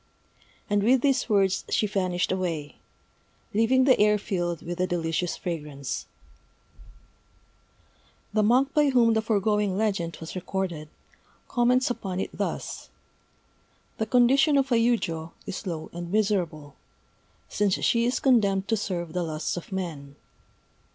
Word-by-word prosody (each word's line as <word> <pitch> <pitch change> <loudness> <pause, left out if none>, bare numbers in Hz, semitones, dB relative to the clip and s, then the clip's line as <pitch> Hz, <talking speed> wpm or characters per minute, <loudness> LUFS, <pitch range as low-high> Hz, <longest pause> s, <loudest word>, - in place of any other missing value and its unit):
And 205 -1 +1
with 245 +4 +4
these 270 -2 +1
words 195 -2 +2
she - - +1
vanished 185 -4 -1
away, 170 -6 -3 0.8
leaving 230 +5 +3
the 260 -1 +4
air 210 0 +4
filled 175 -4 -3
with 175 +1 -4
a 185 - +1
delicious 170 0 -1
fragrance. 150 -5 -5 2.3
The 215 - +3
monk 255 +6 +3
by 295 -1 +4
whom 240 -3 +4
the 220 - +2
foregoing 210 -2 +1
legend 195 -6 -1
was 160 - -8
recorded, 180 -4 -4 0.6
comments 250 +1 +2
upon 190 -6 -4
it - - -3
thus: - - -4 1.1
The 220 - -1
condition 270 +5 +4
of 270 -1 +1
a - - +4
yujô 170 -9 0
is 195 +1 -6
low 160 -3 -5
and 175 0 -6
miserable, 180 -9 -1 0.7
since 205 -2 +1
she 235 0 +3
is 245 - 0
condemned 200 -7 +2
to 225 - +2
serve 175 -5 -4
the 180 - -1
lusts 155 -2 -3
of 175 - -8
men. 155 -7 -5
195 Hz, 135 wpm, -26 LUFS, 175-230 Hz, 2.3 s, with